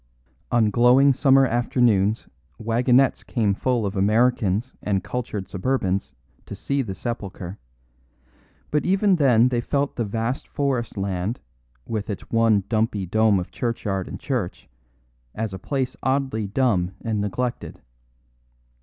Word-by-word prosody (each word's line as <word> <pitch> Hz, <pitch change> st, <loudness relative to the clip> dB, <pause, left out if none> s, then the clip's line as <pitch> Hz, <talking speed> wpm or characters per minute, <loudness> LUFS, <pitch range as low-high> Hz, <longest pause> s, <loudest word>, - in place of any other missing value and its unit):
On 115 Hz, -3 st, +3 dB
glowing 125 Hz, +4 st, +5 dB
summer 135 Hz, 0 st, +4 dB
afternoons 115 Hz, -3 st, +1 dB, 0.3 s
wagonettes 120 Hz, +4 st, +2 dB
came 105 Hz, -5 st, 0 dB
full 120 Hz, +1 st, 0 dB
of 100 Hz, +1 st, -3 dB
Americans 110 Hz, +2 st, +1 dB
and 95 Hz, -3 st, -1 dB
cultured 110 Hz, -6 st, -4 dB
suburbans 95 Hz, -1 st, -1 dB, 0.3 s
to -, -, -6 dB
see 140 Hz, 0 st, -1 dB
the 100 Hz, -7 st, -5 dB
sepulchre; 100 Hz, -4 st, -6 dB, 1.1 s
but 150 Hz, -, +1 dB
even 195 Hz, 0 st, +3 dB
then 125 Hz, -5 st, +4 dB
they 120 Hz, -2 st, 0 dB
felt 140 Hz, +3 st, -1 dB
the 120 Hz, -, 0 dB
vast 115 Hz, +5 st, -3 dB
forest 130 Hz, -6 st, -2 dB
land 95 Hz, +3 st, -2 dB, 0.5 s
with 110 Hz, -2 st, -4 dB
its 100 Hz, -, -6 dB
one 115 Hz, -3 st, +3 dB
dumpy 110 Hz, -3 st, 0 dB
dome 110 Hz, +1 st, +3 dB
of 90 Hz, -, -6 dB
churchyard 105 Hz, -6 st, -2 dB
and -, -, -7 dB
church 120 Hz, -10 st, -3 dB, 0.7 s
as 110 Hz, -2 st, -3 dB
a 95 Hz, -, -6 dB
place 130 Hz, +5 st, -2 dB
oddly 130 Hz, -6 st, 0 dB
dumb 95 Hz, -6 st, 0 dB
and 110 Hz, -3 st, -1 dB
neglected. 120 Hz, +5 st, -3 dB
115 Hz, 130 wpm, -23 LUFS, 100-125 Hz, 1.1 s, glowing